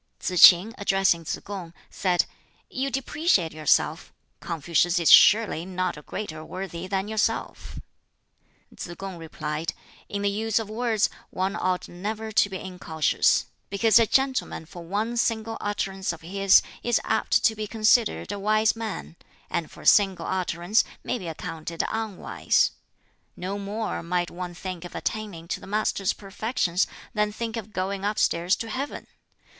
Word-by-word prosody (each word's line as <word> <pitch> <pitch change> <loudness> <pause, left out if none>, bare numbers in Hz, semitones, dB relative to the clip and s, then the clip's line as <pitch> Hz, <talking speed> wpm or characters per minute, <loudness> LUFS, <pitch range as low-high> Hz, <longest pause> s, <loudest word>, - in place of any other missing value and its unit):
Tsz 180 -1 0
k'in, 185 +5 -1
addressing 195 -4 +2
Tsz - - -2
kung, 180 -4 -7 0.2
said, 180 -2 +1 0.5
"You 265 +1 -1
depreciate 270 - +1
yourself. 155 +1 +1 0.3
Confucius 170 +2 +1
is 170 -2 +4
surely 210 -6 +7
not 185 0 -2
a 150 - -10
greater 155 -1 -6
worthy 185 0 -6
than 195 +1 -1
yourself." 220 0 -2 1.0
Tsz 175 - -7
kung 190 -3 -7
replied, 155 0 -4 0.4
"In 200 0 -3
the 200 - +3
use 220 +1 0
of 220 -2 -2
words 225 -2 +1 0.2
one 190 +2 -2
ought 185 -3 -1
never 215 +5 -5
to 205 -1 +3
be 190 - -4
incautious; 175 -5 +1 0.2
because 220 +3 +4
a 230 - +4
gentleman 265 -8 0
for 175 +2 -11
one 210 +7 -2
single 225 -1 0
utterance 195 -2 -2
of 170 - -9
his 195 +3 +4 0.2
is 240 -1 +2
apt - - +1
to 225 - +4
be 215 0 -4
considered 220 +1 +2
a 205 - -4
wise 215 +2 +2
man, 220 -7 -6 0.3
and 165 - -2
for - - -13
a - - -13
single 195 -4 +4
utterance 180 +2 +1 0.2
may 250 - -2
be 180 - -7
accounted 165 0 -4
unwise. 220 -4 0 0.6
No 195 +3 -4
more 210 +2 -3
might 175 +1 -1
one 175 0 -6
think 180 -1 -6
of 175 - -9
attaining 205 -7 -4
to - - -2
the - - -12
Master's 200 -1 0
perfections 195 -2 -1 0.3
than 210 -1 +1
think 225 +1 -4
of 220 -2 -6
going 195 0 -3
upstairs 185 -3 +1
to 230 - -6
Heaven! 275 +4 -4
195 Hz, 155 wpm, -25 LUFS, 175-215 Hz, 1.0 s, surely